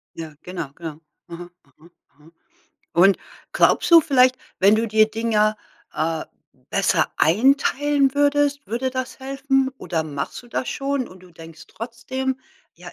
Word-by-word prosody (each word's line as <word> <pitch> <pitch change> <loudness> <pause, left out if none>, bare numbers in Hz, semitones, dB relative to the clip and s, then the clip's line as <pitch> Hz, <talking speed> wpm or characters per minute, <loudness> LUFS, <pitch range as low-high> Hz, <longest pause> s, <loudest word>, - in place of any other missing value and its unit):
Ja, 160 -2 -8
genau, 180 -5 -6
genau. 160 -1 -8 0.3
Aha, 175 +1 -9
aha, 150 +4 -22 0.3
aha. 150 +3 -21 0.6
Und 190 +3 +5 0.4
glaubst - - +3
du 335 -1 +9
vielleicht, 255 -4 +4 0.2
wenn 200 +3 +5
du 225 +1 0
dir 215 0 +3
Dinger, 215 -1 +1 0.4
äh, 160 0 -2 0.5
besser 190 -4 +1
einteilen 275 - +2
würdest, 290 0 +1
würde 250 +3 -2
das 260 0 -5
helfen 270 0 0
oder 165 -3 -2
machst 145 - -5
du 240 - -17
das 245 - -3
schon 275 -2 -2
und 185 0 -15
du 180 0 -17
denkst 165 -1 -13
trotzdem, 245 +4 -4 0.4
ja: - - -12
225 Hz, 145 wpm, -22 LUFS, 170-265 Hz, 0.6 s, du